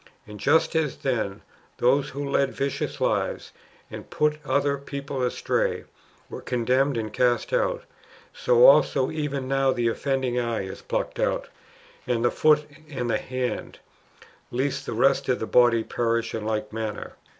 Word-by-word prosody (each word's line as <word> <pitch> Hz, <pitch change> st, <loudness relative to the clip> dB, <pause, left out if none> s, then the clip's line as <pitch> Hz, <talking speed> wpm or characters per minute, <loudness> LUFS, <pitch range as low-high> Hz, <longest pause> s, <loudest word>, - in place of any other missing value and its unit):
And 105 Hz, 0 st, -11 dB
just 160 Hz, +8 st, +2 dB
as 155 Hz, -4 st, 0 dB
then, 110 Hz, -7 st, -2 dB, 0.3 s
those 135 Hz, +3 st, +2 dB
who 140 Hz, +1 st, -5 dB
led 140 Hz, 0 st, +1 dB
vicious 140 Hz, 0 st, -3 dB
lives, -, -, -1 dB, 0.4 s
and -, -, -9 dB
put 150 Hz, 0 st, 0 dB
other 140 Hz, -1 st, +1 dB
people 140 Hz, -1 st, -5 dB
astray, 125 Hz, -, 0 dB, 0.4 s
were -, -, -8 dB
condemned 125 Hz, +2 st, +1 dB
and 110 Hz, -1 st, -4 dB
cast 125 Hz, -, +1 dB
out, -, -, 0 dB, 0.5 s
so -, -, +4 dB
also 140 Hz, -, +5 dB
even 145 Hz, -4 st, -3 dB
now 135 Hz, 0 st, +2 dB
the 120 Hz, -2 st, +1 dB
offending 130 Hz, -1 st, -1 dB
eye 115 Hz, -4 st, -1 dB
is 95 Hz, -, -8 dB
plucked -, -, -3 dB
out, -, -, -1 dB, 0.6 s
and 120 Hz, -1 st, 0 dB
the 120 Hz, -, +3 dB
foot 150 Hz, -1 st, +3 dB, 0.2 s
and 125 Hz, -5 st, -3 dB
the -, -, +1 dB
hand, 130 Hz, -1 st, -4 dB, 0.7 s
lest 130 Hz, +3 st, -2 dB
the -, -, -3 dB
rest 135 Hz, +4 st, +2 dB
of 125 Hz, -, +2 dB
the -, -, -2 dB
body 120 Hz, -1 st, +4 dB
perish 115 Hz, 0 st, -1 dB
in 110 Hz, -1 st, -4 dB
like 110 Hz, -1 st, -2 dB
manner. 110 Hz, -1 st, -5 dB
130 Hz, 155 wpm, -25 LUFS, 120-140 Hz, 0.7 s, also